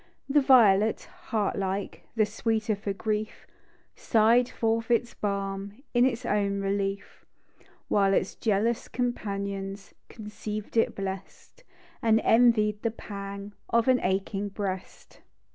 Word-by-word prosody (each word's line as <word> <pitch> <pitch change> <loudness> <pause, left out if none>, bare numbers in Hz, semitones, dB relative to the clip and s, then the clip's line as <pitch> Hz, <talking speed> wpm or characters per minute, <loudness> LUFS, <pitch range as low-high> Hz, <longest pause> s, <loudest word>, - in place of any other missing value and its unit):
The 290 +1 +4
violet 220 -6 +5 0.3
(heart 215 -5 0
like), 195 +1 -3
The 220 -2 +3
sweeter 220 0 -1
for 200 0 -4
grief, 215 +2 -3 0.5
Sigli'cl 235 +2 +3
forth 225 0 -1
its 240 0 +1
balm 200 +3 -4
In 240 0 +5
its 245 -2 -3
own 200 -1 0
relief; 195 0 -3 0.6
While 195 -1 +3
its - - 0
jealous 220 +2 0
companions 200 -5 -4 0.2
Conceiv'd 210 0 -7
it 225 - +2
blest, 195 - -7 0.4
And 225 -2 +4
envied 220 -3 +4
the 230 - +1
pang 200 -2 -7 0.2
Of 230 +1 +2
an 255 -1 +5
aching 195 +2 -1
breast. 195 -2 -6
210 Hz, 120 wpm, -27 LUFS, 200-230 Hz, 0.6 s, violet